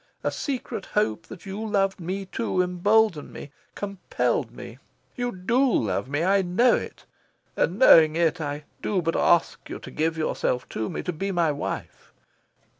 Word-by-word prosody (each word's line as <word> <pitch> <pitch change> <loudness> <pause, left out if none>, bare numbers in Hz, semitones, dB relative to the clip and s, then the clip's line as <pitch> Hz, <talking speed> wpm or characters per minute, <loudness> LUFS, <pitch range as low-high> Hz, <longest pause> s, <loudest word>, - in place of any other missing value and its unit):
A - - 0
secret 255 -8 -4
hope 110 - -1
that 180 - -11
you 200 +3 -5
loved 195 -3 0
me 190 +3 -4
too 185 -1 -1
emboldened 180 -1 +2
me, 140 - -9 0.2
compelled 200 -2 -2
me. - - -11 0.4
You 245 -1 -2
DO 190 +6 0
love 110 +3 0
me. 145 +3 0
I 195 +2 +3
know 195 +7 +3
it. - - -6 0.5
And, 180 - 0
knowing 160 -10 +7
it, 165 0 +1
I 145 0 -4 0.2
do 190 -4 0
but 165 0 0
ask 170 -1 +2
you - - -5
to - - -11
give 160 +1 -1
yourself 125 -5 -1
to 110 -1 -3
me, - - -4
to 180 - -3
be 195 +5 -3
my 170 -4 +2
wife. 145 - -6
180 Hz, 170 wpm, -25 LUFS, 160-200 Hz, 0.5 s, knowing